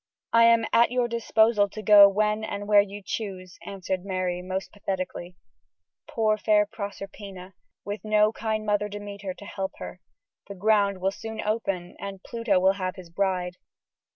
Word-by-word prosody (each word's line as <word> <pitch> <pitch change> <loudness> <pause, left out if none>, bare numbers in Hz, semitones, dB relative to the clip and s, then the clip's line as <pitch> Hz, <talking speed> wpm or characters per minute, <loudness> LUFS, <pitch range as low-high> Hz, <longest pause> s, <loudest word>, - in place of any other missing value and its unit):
I 230 0 +7
am 230 -1 +5
at 235 +1 +5
your 245 0 0
disposal 225 -2 +2
to 215 - -8
go 205 -1 +9
when 210 +2 0
and 205 -1 -5
where 205 -1 +7
you 200 0 -7
choose," 185 -4 -6
answered 190 -2 -4
Mary, 185 -2 -2
most 185 +1 -4
pathetically. 185 -3 -5 0.7
Poor, 215 -2 +1
fair 210 -1 +3
Proserpina, 195 -2 -8 0.3
with 205 +1 -5
no 215 0 +3
kind 220 -1 -2
mother 210 0 0
Demeter 200 -2 -7
to 200 - -12
help 195 -1 -4
her. 185 - -9 0.5
The 200 - -8
ground 200 -1 +2
will 190 +1 +1
soon 220 +2 -8
open, 195 -5 -2
and 195 -1 -7
Pluto 230 -5 0
will 190 +1 +4
have 185 -2 -4
his 180 -3 -12
bride. 180 -1 -1
200 Hz, 160 wpm, -26 LUFS, 190-215 Hz, 0.7 s, go